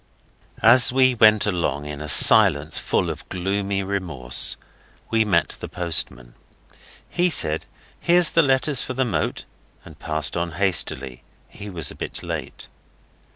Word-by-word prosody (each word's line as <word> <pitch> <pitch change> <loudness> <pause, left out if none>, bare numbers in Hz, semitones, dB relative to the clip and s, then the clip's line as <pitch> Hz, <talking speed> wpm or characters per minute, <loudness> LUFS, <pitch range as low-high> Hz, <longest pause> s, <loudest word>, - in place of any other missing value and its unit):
As 120 +2 +6
we 130 0 +3
went 110 -2 +4
along, 80 -8 -2
in 75 0 -8
a 75 - -4
silence - - +5
full - - -1
of - - -11
gloomy 100 +2 -3
remorse, 85 -11 -1 0.5
we 115 -1 +2
met 95 -6 0
the - - -7
postman. 75 -8 -3 0.7
He 180 +1 0
said 80 - 0 0.3
'Here's 175 -1 +2
the 165 - +3
letters 135 -1 +1
for 130 - -5
the 130 0 0
Moat,' 115 - -3 0.4
and - - -15
passed 75 0 -1
on 85 -1 -3
hastily. 70 -9 -1 0.3
He 105 - -11
was 85 -6 -2
a - - -12
bit - - -7
late. - - -7
95 Hz, 145 wpm, -21 LUFS, 75-120 Hz, 0.7 s, As